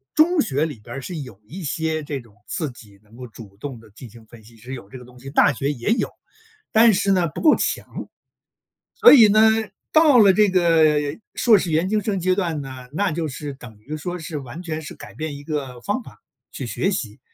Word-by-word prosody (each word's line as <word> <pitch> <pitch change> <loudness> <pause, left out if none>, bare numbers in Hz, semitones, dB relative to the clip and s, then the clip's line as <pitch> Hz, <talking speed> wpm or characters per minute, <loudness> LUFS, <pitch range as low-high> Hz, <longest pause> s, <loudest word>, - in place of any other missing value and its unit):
中 320 +1 +4
学 145 - 0
里 145 -8 -7
边 120 +4 -10
儿 135 - -5
是 175 +6 -7
有 125 -9 -9
一 180 - -8
些 160 +1 -2
这 145 -1 -4
种 115 -5 -18
自 155 -6 -3
己 105 -5 -17
能 110 +1 -21
够 125 +1 -9
主 110 -3 -13
动 130 0 -7
地 110 -1 -18
进 115 +3 -12
行 115 +1 -16
分 110 0 -16
析， 115 +1 -18
是 125 +4 -9
有 120 -6 -9
这 130 - -10
个 125 - -13
东 125 0 -17
西， 135 +2 -9
大 140 +1 +4
学 140 +3 -2
也 120 -5 -4
有， 235 - +1 0.6
但 225 +1 +6
是 200 0 +1
呢， 180 -3 +2
不 155 - -7
够 310 - +6
强。 - - -2 1.1
所 470 0 +8
以 235 -7 +9
呢， 215 +1 +4 0.5
到 310 -4 +6
了 200 -3 +7
这 210 0 +4
个 165 -4 +4 0.4
硕 225 -4 +5
士 180 -3 -2
研 165 +4 +1
究 215 0 +1
生 205 -1 -2
阶 185 +1 +1
段 165 -7 -2
呢， 130 -2 -9
那 195 +2 0
就 160 0 -2
是 145 0 -6
等 120 -5 -13
于 150 +8 -7
说 175 +4 -5
是 160 -2 -6
完 140 +6 -8
全 160 -2 -4
是 150 - -9
改 - - -12
变 155 -2 -5
一 145 - -12
个 140 -5 -5
方 205 - -2
法 - - -16 0.3
去 135 - -5
学 175 +10 -1
习。 110 - -4
150 Hz, 250 characters per minute, -22 LUFS, 125-185 Hz, 1.1 s, 以